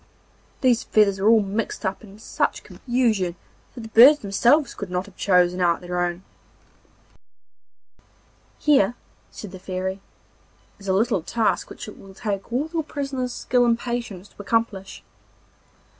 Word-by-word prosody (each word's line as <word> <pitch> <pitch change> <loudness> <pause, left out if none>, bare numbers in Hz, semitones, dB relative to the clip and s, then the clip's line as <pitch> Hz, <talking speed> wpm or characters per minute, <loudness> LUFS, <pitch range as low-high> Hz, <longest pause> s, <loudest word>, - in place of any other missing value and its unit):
These 250 -2 +3
feathers 200 -3 +2
were 205 +3 +3
all 225 -2 +5
mixed 205 +3 -3
up 190 +4 -3
in 200 -1 -13
such 220 - -2
confusion 225 -8 -1 0.4
that 245 - -7
the 225 - -9
birds 255 +7 +8
themselves 245 +7 +2
could 200 - -7
not 180 +1 -2
have 200 - -16
chosen 180 -1 +2
out 170 -1 +2
their 180 0 -3
own. 175 +1 -2 2.3
'Here,' 245 -7 +3 0.3
said 205 - -10
the 190 - -10
Fairy, 190 +1 -4 0.8
'is 200 - -12
a 190 - +2
little 210 -1 +1
task 220 +7 -1
which - - -9
it 210 - -11
will 195 -1 -14
take 200 0 -4
all 265 +6 0
your 330 - 0
prisoner's 275 -4 -4
skill 245 0 +1
and 235 -1 +3
patience 235 -6 -5
to - - -12
accomplish. 205 -2 -2
210 Hz, 150 wpm, -23 LUFS, 190-240 Hz, 2.3 s, birds